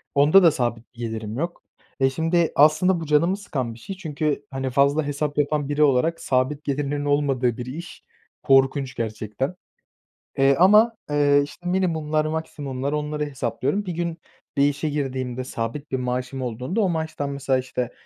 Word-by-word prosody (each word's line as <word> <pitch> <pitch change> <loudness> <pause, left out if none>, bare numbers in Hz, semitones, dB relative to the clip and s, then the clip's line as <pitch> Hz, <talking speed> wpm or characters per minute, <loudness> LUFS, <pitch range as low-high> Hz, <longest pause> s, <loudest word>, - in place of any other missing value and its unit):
Onda 150 +7 +6
da 165 - +7
sabit 120 -3 -3
bir - - -18
gelirim 110 -1 -4
yok. 170 +2 -4 0.4
E, 135 0 +4
şimdi 165 +4 +1
aslında 155 +5 +4
bu 165 - -5
canımı 165 +6 +2
sıkan 135 - -4
bir 115 - -14
şey 195 - -7
çünkü, 150 -4 -2
hani, 135 0 -2
fazla 140 +4 +2
hesap 145 0 -2
yapan 145 -1 0
biri 145 +1 +2
olarak 150 +4 +2
sabit 135 +3 0
gelirlerin 145 +1 -2
olmadığı 135 -5 +1
bir 125 - -5
iş 160 +8 -8 0.4
korkunç 135 -1 +3
gerçekten. 110 - -3 0.8
Eee, 135 0 +5
ama, 215 +5 +6
eee, 145 -1 +4
işte, 150 +5 -12
minimumlar, 160 -5 0
maksimumlar, 145 -4 -3
onları 150 0 -2
hesaplıyorum. 140 - -2
Bir 180 - -2
gün 170 0 -3 0.4
bir 140 +1 +4
işe 145 +2 -2
girdiğimde, 130 -3 -3
sabit 125 +4 -5
bir - - +2
maaşım 125 +1 -3
olduğunda, 125 - -2
o 200 - +3
maaştan 160 -4 -2
mesela, 140 -1 0
işte, 125 -1 -3
145 Hz, 165 wpm, -23 LUFS, 130-155 Hz, 0.8 s, da